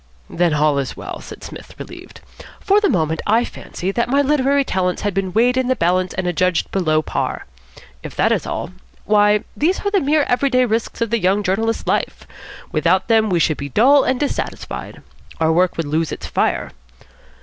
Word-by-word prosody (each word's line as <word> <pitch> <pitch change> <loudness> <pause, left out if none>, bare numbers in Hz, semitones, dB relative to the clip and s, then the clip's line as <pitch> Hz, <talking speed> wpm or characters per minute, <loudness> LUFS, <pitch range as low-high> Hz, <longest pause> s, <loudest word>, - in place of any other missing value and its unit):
"Then 170 -3 +1
all 150 -1 +2
is 135 - -4
well," - - -7
said - - -11
Psmith, - - -10
relieved. - - -11 0.4
"For 410 +1 +3
the 410 - +2
moment 160 -3 0
I 225 +3 +3
fancied 185 +2 -5
that 235 +3 -1
my 280 +2 +3
literary 280 0 +2
talents 180 -4 -1
had 205 -1 -1
been 190 0 -1
weighed 245 +6 +2
in 260 -1 +1
the 260 - +2
balance 185 -1 0
and 190 - -2
adjudged 180 0 0
below 155 -5 +1
par. - - -3 0.6
If - - -9
that - - +2
is - - 0
all - - -4 0.3
why, 210 0 +3
these 345 +6 +1
are 405 - +1
the 395 -2 +2
mere 295 +1 +2
everyday 255 0 +2
risks 225 0 -2
of 230 -1 0
the 235 - +2
young 195 +2 +1
journalist's 225 +4 -1
life. - - -1 0.5
Without 175 +7 +1
them 220 -1 +3
we 180 - +2
should 155 -2 +1
be 140 - -5
dull 270 - +5
and 260 -1 0
dissatisfied. 290 - -4 0.4
Our 160 0 +2
work 180 +2 +2
would 165 - -1
lose 155 +1 -1
its - - -6
fire. - - -1
205 Hz, 195 wpm, -19 LUFS, 175-255 Hz, 0.6 s, dull